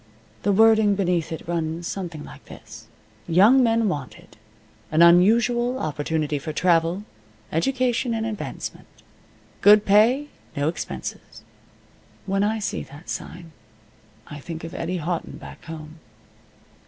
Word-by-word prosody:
The 205 Hz, -, +1 dB
wording 220 Hz, 0 st, +5 dB
beneath 180 Hz, -5 st, 0 dB
it 160 Hz, -, -7 dB
runs 165 Hz, 0 st, -3 dB
something 170 Hz, -5 st, -5 dB
like -, -, -13 dB
this: -, -, -13 dB, 0.4 s
"Young 205 Hz, +10 st, +6 dB
men 230 Hz, -2 st, +2 dB
wanted. 145 Hz, -8 st, -6 dB, 0.5 s
An 160 Hz, +2 st, +4 dB
unusual 235 Hz, +8 st, +4 dB
opportunity 150 Hz, -, -2 dB
for 155 Hz, +3 st, -5 dB
travel, 170 Hz, +3 st, +1 dB, 0.5 s
education 245 Hz, -, 0 dB
and 225 Hz, 0 st, -2 dB
advancement. 215 Hz, -2 st, -6 dB, 0.7 s
Good 210 Hz, 0 st, +7 dB
pay. 235 Hz, +9 st, +4 dB, 0.3 s
No 145 Hz, +2 st, +1 dB
expenses." 170 Hz, -, -7 dB, 0.8 s
When 195 Hz, 0 st, 0 dB
I 215 Hz, +2 st, +1 dB
see 210 Hz, -, -3 dB
that 145 Hz, +5 st, -12 dB
sign 170 Hz, -1 st, -7 dB, 0.7 s
I 145 Hz, -, -9 dB
think 160 Hz, +2 st, -8 dB
of 165 Hz, -, -7 dB
Eddie 175 Hz, +2 st, -3 dB
Houghton 170 Hz, +1 st, -4 dB
back -, -, -12 dB
home. 160 Hz, 0 st, -9 dB
180 Hz, 125 wpm, -23 LUFS, 160-220 Hz, 0.8 s, Good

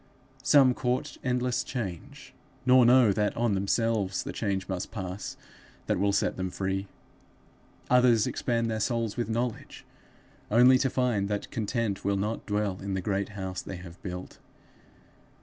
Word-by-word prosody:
Some 135 Hz, -2 st, +5 dB
court 125 Hz, 0 st, -2 dB
endless 125 Hz, -1 st, 0 dB
change, 125 Hz, -, -6 dB, 0.3 s
nor 125 Hz, -1 st, +6 dB
know 125 Hz, -3 st, +6 dB
that 105 Hz, +1 st, 0 dB
on 115 Hz, -2 st, +1 dB
themselves 100 Hz, 0 st, 0 dB
the -, -, -6 dB
change 100 Hz, -3 st, -2 dB
must 95 Hz, -2 st, -4 dB
pass 95 Hz, -2 st, -6 dB, 0.5 s
that -, -, 0 dB
will 100 Hz, +1 st, +2 dB
set -, -, 0 dB
them 95 Hz, 0 st, -2 dB
free. 95 Hz, +1 st, -2 dB, 1.0 s
Others 125 Hz, -3 st, +5 dB
expand 115 Hz, -2 st, -1 dB
their 110 Hz, -, -2 dB
souls 115 Hz, -2 st, -1 dB
with 120 Hz, -2 st, -2 dB
knowledge, 115 Hz, 0 st, -3 dB, 0.6 s
only 125 Hz, +4 st, +6 dB
to 135 Hz, -, +1 dB
find 120 Hz, -6 st, 0 dB
that 105 Hz, -1 st, -3 dB
content 110 Hz, -2 st, -2 dB
will 100 Hz, 0 st, +1 dB
not 105 Hz, +3 st, -3 dB
dwell 105 Hz, -2 st, -1 dB
in 100 Hz, 0 st, -3 dB
the -, -, -1 dB
great 100 Hz, +1 st, -1 dB
house 95 Hz, -1 st, -4 dB
they 95 Hz, -, -7 dB
have 90 Hz, 0 st, -12 dB
built. 90 Hz, -1 st, -7 dB
105 Hz, 150 wpm, -28 LUFS, 95-125 Hz, 1.0 s, nor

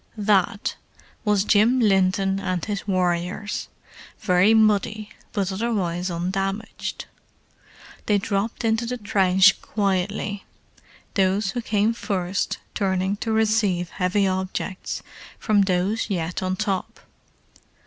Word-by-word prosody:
"That" 200 Hz, -1 st, +1 dB, 0.5 s
was 210 Hz, -3 st, +2 dB
Jim 220 Hz, +5 st, +4 dB
Linton 195 Hz, -2 st, +2 dB
and 185 Hz, -3 st, -2 dB
his 205 Hz, -2 st, -4 dB
warriors, 180 Hz, +2 st, -1 dB, 0.5 s
very 185 Hz, +4 st, +4 dB
muddy, 215 Hz, 0 st, +2 dB, 0.2 s
but 200 Hz, -3 st, -1 dB
otherwise 190 Hz, -4 st, -1 dB
undamaged. 195 Hz, +5 st, -3 dB, 1.0 s
They 210 Hz, -, +4 dB
dropped 200 Hz, +4 st, -2 dB
into 225 Hz, +1 st, +1 dB
the 250 Hz, +1 st, -3 dB
trench 195 Hz, -2 st, +4 dB
quietly, 200 Hz, 0 st, -1 dB, 0.7 s
those 195 Hz, +1 st, +1 dB
who 240 Hz, -, -3 dB
came 220 Hz, 0 st, +1 dB
first 190 Hz, -4 st, -2 dB, 0.2 s
turning 190 Hz, 0 st, 0 dB
to 225 Hz, -, -3 dB
receive 215 Hz, -5 st, +1 dB
heavy 195 Hz, +2 st, +1 dB
objects 190 Hz, 0 st, -3 dB, 0.3 s
from 210 Hz, -2 st, +2 dB
those 190 Hz, +4 st, 0 dB
yet 175 Hz, -2 st, -2 dB
on 185 Hz, 0 st, -1 dB
top. 195 Hz, -2 st, -3 dB
195 Hz, 105 wpm, -23 LUFS, 185-215 Hz, 1.0 s, Jim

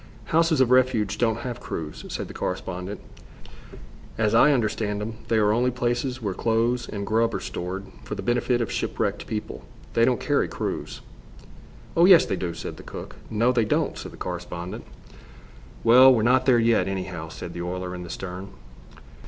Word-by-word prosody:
"Houses 165 Hz, -2 st, +4 dB
of 125 Hz, -1 st, +3 dB
refuge 120 Hz, -5 st, +3 dB
don't 115 Hz, -1 st, +1 dB
have 125 Hz, -2 st, -5 dB
crews," 75 Hz, -2 st, -6 dB
said -, -, -4 dB
the -, -, -10 dB
correspondent. 90 Hz, +2 st, -4 dB, 1.2 s
"As 110 Hz, -1 st, +1 dB
I 135 Hz, +6 st, +6 dB
understand 110 Hz, -5 st, 0 dB
them, 110 Hz, +1 st, -5 dB
they 115 Hz, -, +2 dB
are 105 Hz, -1 st, +4 dB
only 120 Hz, +3 st, +2 dB
places 125 Hz, +1 st, -2 dB
where 100 Hz, -3 st, -1 dB
clothes 115 Hz, +3 st, 0 dB
and 100 Hz, -1 st, -4 dB
grub 115 Hz, +2 st, +1 dB
are -, -, -1 dB
stored 95 Hz, +3 st, -5 dB, 0.2 s
for -, -, -5 dB
the -, -, -6 dB
benefit 120 Hz, 0 st, +1 dB
of 115 Hz, -, -2 dB
shipwrecked -, -, -2 dB
people. 105 Hz, -1 st, -5 dB, 0.3 s
They 115 Hz, -, +3 dB
don't 125 Hz, -2 st, +3 dB
carry -, -, +1 dB
crews." -, -, -4 dB, 0.9 s
"Oh, 170 Hz, -, +6 dB
yes, 180 Hz, -3 st, +8 dB
they -, -, -1 dB
do," 85 Hz, -2 st, -4 dB
said -, -, -6 dB
the -, -, -10 dB
cook. -, -, -9 dB
"No, 115 Hz, +3 st, +2 dB
they 120 Hz, -2 st, +2 dB
don't," 105 Hz, -, 0 dB
said -, -, -7 dB
the -, -, -13 dB
correspondent. 90 Hz, 0 st, -6 dB, 1.0 s
"Well, 125 Hz, +3 st, +8 dB
we're 115 Hz, -4 st, +3 dB
not 125 Hz, +3 st, +3 dB
there 125 Hz, -2 st, +6 dB
yet, 115 Hz, -5 st, +3 dB
anyhow," 90 Hz, -4 st, -4 dB
said 85 Hz, +2 st, -8 dB
the 85 Hz, -, -5 dB
oiler, 90 Hz, +1 st, -4 dB
in 90 Hz, -, -6 dB
the 85 Hz, -, -8 dB
stern. 95 Hz, +2 st, -6 dB
110 Hz, 180 wpm, -25 LUFS, 95-120 Hz, 1.2 s, yes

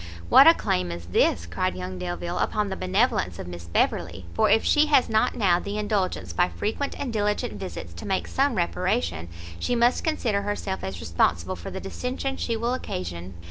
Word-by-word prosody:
"What -, -, +9 dB
a -, -, +9 dB
claim 90 Hz, -1 st, -1 dB
is 85 Hz, 0 st, -6 dB
this," 85 Hz, -1 st, +2 dB
cried 85 Hz, +1 st, -2 dB
young 90 Hz, 0 st, -6 dB
Delvile, 90 Hz, -1 st, -3 dB
"upon 210 Hz, -1 st, 0 dB
the 190 Hz, -, -3 dB
benevolence 185 Hz, -, +1 dB
of -, -, -6 dB
Miss 85 Hz, -1 st, -8 dB
Beverley! 85 Hz, +1 st, -1 dB
for -, -, +3 dB
if 225 Hz, -, +4 dB
she 300 Hz, +1 st, +4 dB
has 285 Hz, -4 st, +4 dB
not 220 Hz, -1 st, +2 dB
now 185 Hz, -6 st, +3 dB
the 200 Hz, +3 st, -4 dB
indulgence 200 Hz, -, -1 dB
by 85 Hz, -, +2 dB
frequent 215 Hz, -, -3 dB
and 265 Hz, -5 st, -3 dB
diligent 210 Hz, -1 st, 0 dB
visits 90 Hz, -, -7 dB
to 85 Hz, -, -8 dB
make 190 Hz, -1 st, 0 dB
some 275 Hz, -2 st, +1 dB
reparation, 85 Hz, -, -1 dB, 0.3 s
she 245 Hz, -, 0 dB
must 240 Hz, +1 st, +3 dB
consider 240 Hz, -10 st, 0 dB
herself 200 Hz, -1 st, -3 dB
as 95 Hz, -3 st, -5 dB
responsible 85 Hz, +2 st, +1 dB
for 85 Hz, -, -8 dB
the 190 Hz, -, -5 dB
dissension 250 Hz, +7 st, -3 dB
she 230 Hz, -3 st, -2 dB
will 235 Hz, +2 st, -1 dB
occasion." 90 Hz, -, -5 dB
185 Hz, 190 wpm, -25 LUFS, -, 0.3 s, What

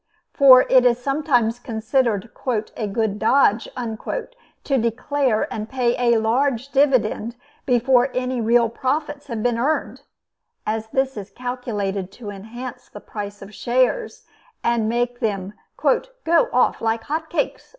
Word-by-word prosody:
For 260 Hz, -3 st, +8 dB
it 255 Hz, -1 st, +5 dB
is 240 Hz, -1 st, +4 dB
sometimes 245 Hz, -4 st, 0 dB
considered 230 Hz, -2 st, -1 dB, 0.4 s
"a 215 Hz, -, -3 dB
good 210 Hz, 0 st, -1 dB
dodge" 225 Hz, -2 st, +3 dB
to 270 Hz, -, -4 dB
declare 235 Hz, +1 st, 0 dB
and 215 Hz, 0 st, -5 dB
pay 245 Hz, -2 st, +1 dB, 0.2 s
a -, -, +4 dB
large 245 Hz, +3 st, 0 dB
dividend 255 Hz, -5 st, +1 dB, 0.3 s
before 250 Hz, +1 st, +3 dB
any 255 Hz, -1 st, -1 dB
real 235 Hz, +1 st, +4 dB
profits 285 Hz, +5 st, -3 dB
have 230 Hz, -4 st, -4 dB
been 240 Hz, -1 st, +1 dB
earned; 295 Hz, +6 st, -1 dB, 0.6 s
as 220 Hz, 0 st, -2 dB
this 265 Hz, +2 st, -1 dB
is 200 Hz, -1 st, -6 dB
calculated 205 Hz, -5 st, -4 dB
to 215 Hz, -4 st, -8 dB
enhance 230 Hz, +6 st, -9 dB
the 205 Hz, -, -10 dB
price 205 Hz, -1 st, -7 dB
of 200 Hz, +2 st, -12 dB
shares, 255 Hz, -, 0 dB, 0.4 s
and 235 Hz, -2 st, +1 dB
to -, -, 0 dB
make 240 Hz, +1 st, -1 dB
them 200 Hz, -2 st, -2 dB, 0.2 s
"go -, -, +1 dB
off -, -, +2 dB
like 225 Hz, 0 st, 0 dB
hot 315 Hz, +4 st, -3 dB
cakes." -, -, -2 dB
240 Hz, 140 wpm, -22 LUFS, 220-265 Hz, 0.6 s, For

